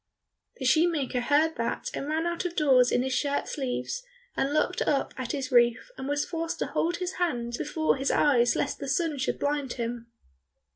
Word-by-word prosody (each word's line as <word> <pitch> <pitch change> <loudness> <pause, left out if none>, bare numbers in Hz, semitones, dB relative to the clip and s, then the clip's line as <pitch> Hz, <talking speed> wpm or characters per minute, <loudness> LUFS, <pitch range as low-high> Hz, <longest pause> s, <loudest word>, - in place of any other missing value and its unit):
The 260 - -5
shoemaker 300 -3 +2
heard 300 +5 +2
that 230 0 -2
and 275 - -4
ran 315 +2 0
out 345 0 -1
of 350 -1 -3
doors 260 -5 +4
in 245 - +2
his 260 0 -2
shirt 285 +1 0
sleeves, 270 - -3 0.3
and 275 - 0
looked 310 +4 +1
up 280 -2 0
at 255 -2 -4
his 275 -3 -3
roof, 240 - +3
and 265 - -6
was 290 0 0
forced 330 -1 -3
to - - -1
hold 345 +2 -1
his 365 0 -4
hand 240 -9 -1
before 310 +3 0
his 270 +1 -1
eyes 245 -5 +3
lest - - -1
the 275 - -5
sun 300 +1 0
should 265 - -1
blind 285 -2 -1
him. 235 -1 -4
285 Hz, 195 wpm, -27 LUFS, 255-320 Hz, 0.3 s, doors